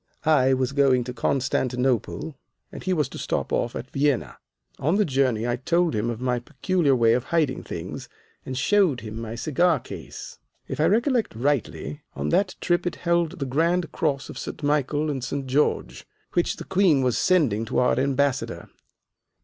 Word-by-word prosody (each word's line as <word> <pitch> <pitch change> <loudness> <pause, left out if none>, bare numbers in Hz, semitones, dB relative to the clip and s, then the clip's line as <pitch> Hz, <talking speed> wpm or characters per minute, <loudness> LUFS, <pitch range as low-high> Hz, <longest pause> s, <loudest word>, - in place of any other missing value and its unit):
I 135 -4 +4
was 130 -1 0
going 135 -3 +3
to 125 +1 -6
Constantinople 130 +3 -1 0.4
and - - -8
he 185 - -2
was 155 -7 +1
to - - -8
stop - - -2
off 120 - 0
at 125 - -6
Vienna. 140 -2 0 0.4
On 160 +7 +1
the 210 0 +3
journey 130 -6 +1
I 120 0 0
told 170 +4 +1
him 110 +2 0
of 115 -2 -4
my 125 -1 0
peculiar 160 +3 +1
way 115 -2 +4
of 125 +1 0
hiding 155 -5 0
things - - -7 0.3
and 130 -1 -5
showed 180 - +3
him 110 0 -6
my 115 0 -5
cigar 155 +5 +2
case. 95 -8 -9 0.3
If 135 - -5
I 155 - +4
recollect 235 - +2
rightly, 120 - -2
on 70 +2 -2
that 195 - +1
trip 175 0 +1
it 175 - -2
held 170 0 0
the 140 - -3
grand 165 +5 +1
cross 140 -4 -1
of - - -8
St. - - -7
Michael 150 +1 +1
and 135 -3 -4
St. 140 +1 -3
George, 130 - 0 0.3
which 175 - +1
the - - -8
Queen 185 -8 +3
was 125 -3 +1
sending 135 - +2
to - - -3
our 125 0 +3
Ambassador. 140 0 -1
135 Hz, 180 wpm, -25 LUFS, 125-165 Hz, 0.4 s, I